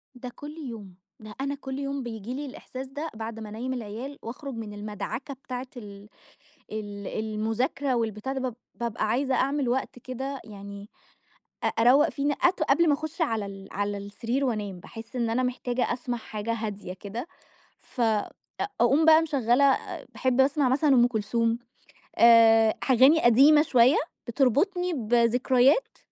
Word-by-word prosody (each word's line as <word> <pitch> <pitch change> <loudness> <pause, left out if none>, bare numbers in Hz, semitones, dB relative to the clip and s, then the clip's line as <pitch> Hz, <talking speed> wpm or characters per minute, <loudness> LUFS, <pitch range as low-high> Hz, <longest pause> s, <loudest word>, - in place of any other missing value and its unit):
ده 250 0 -7
كلّ 295 +2 -9
يوم، 225 - -8 0.2
ده 215 -1 -11
أنا 280 +1 -2
كلّ 265 -1 -6
يوم 275 -1 -3
بييجي 225 0 -6
لي 285 +3 -4
الإحساس 260 -1 -8
ده 295 +4 -6
بعد 225 0 -6
ما 215 - -7
أنَيّم 245 +5 -4
العيال، 245 +4 -6
وأخرج 265 +4 -7
من 220 -2 -6
المدعكة 210 +6 -5
بتاعة 255 -1 -7
ال 205 -3 -10 0.7
ال 205 -2 -6
المذاكرة، 225 +5 -1
والبتاع 225 +1 -2
ده 270 - -3
باب 255 -3 -3 0.2
بابقى 230 -2 -2
عايزة 260 +4 +1
أعمل 275 0 +1
وقت 250 0 -2
كده 265 +2 -5
يعني، 200 -1 -10 0.8
أ - - +3
أرَوّق 250 +6 +4
فيه 280 - -4
ن 290 - +3
أت 355 -2 +3
قبل 310 +3 +3
ما 290 - +5
اخُش 315 +4 -6
على 225 -10 0
ال 195 0 -10
على 205 +1 -2
السرير 230 +7 -3
وأنام، 210 -7 -3
باحس 225 +6 -10
إن 235 -2 0
أنا 240 +3 +1
محتاجة 250 0 -1
أسمع 245 0 -3
حاجة 220 0 -4
هادية 210 -4 -5
كده، 205 - -7 0.5
فاقوم 245 - -1
بقى 320 0 +7
مش 320 -2 -5
مشغّلة، 265 +2 +4 0.4
باحب 260 0 +1
أسمع 275 0 +3
مثلًا 285 +4 +2
أم 240 -1 +6
كلثوم، 230 0 0 0.6
آآ 225 -1 +7 0.2
أغاني 265 +6 +6
قديمة 275 +6 +6
شوية 255 -2 +4 0.3
بتربطني 300 - +1
بذكريات 245 - +2
245 Hz, 155 wpm, -26 LUFS, 220-275 Hz, 0.8 s, بقى